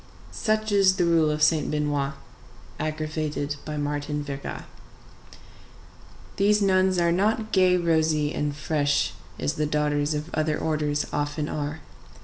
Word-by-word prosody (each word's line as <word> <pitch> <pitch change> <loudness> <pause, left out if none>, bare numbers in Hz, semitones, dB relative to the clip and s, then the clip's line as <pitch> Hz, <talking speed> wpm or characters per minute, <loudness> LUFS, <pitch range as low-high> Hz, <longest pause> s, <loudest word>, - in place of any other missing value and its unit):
Such 215 -1 0
is 195 -2 +5
the 175 - +2
rule 165 -2 +3
of 150 0 0
Saint 155 0 +3
Benoît, 145 -2 -1 0.7
aggravated 155 -1 -3
by 150 -1 -4
Martin 145 0 -2
Verga. 140 -1 -6 1.7
These 210 +1 +4
nuns 190 -2 +3
are 170 -1 +3
not 215 +4 +1
gay, 185 -1 +4
rosy, 160 -3 +1
and 145 -1 -2
fresh, 145 -1 0 0.2
as 75 - -1
the 150 - -1
daughters 150 0 0
of 150 +3 -5
other 155 -1 0
orders 150 -2 -1
often 145 +1 -1
are. 150 +1 -4
155 Hz, 130 wpm, -25 LUFS, 145-170 Hz, 1.7 s, is